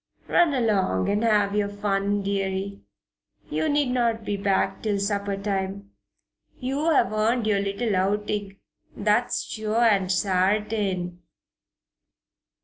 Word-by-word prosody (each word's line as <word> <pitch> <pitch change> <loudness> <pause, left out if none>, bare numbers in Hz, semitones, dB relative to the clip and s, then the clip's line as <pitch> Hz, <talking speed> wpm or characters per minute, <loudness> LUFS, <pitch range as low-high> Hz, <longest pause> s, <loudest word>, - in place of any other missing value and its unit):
Run 340 -5 +3
along 200 - +1
and 205 +2 +1
have 210 -3 +3
your 205 -1 +1
fun, 205 0 -1
deary. 195 0 -2 0.7
You 315 - 0
need 290 -3 +1
not 230 -3 0
be 205 - -1
back 195 -1 0
till 210 -2 0
supper 200 0 -1
time. 195 0 -3 0.7
You 275 +5 -1
have 285 -8 +3
earned 225 +2 +1
your 210 -2 +2
little 200 +2 -1
outing, 200 +1 -1 0.4
that's 210 +4 +1
sure 220 +2 -1
and 195 -5 +3
sartain." 190 -1 0
205 Hz, 120 wpm, -25 LUFS, 195-220 Hz, 0.7 s, Run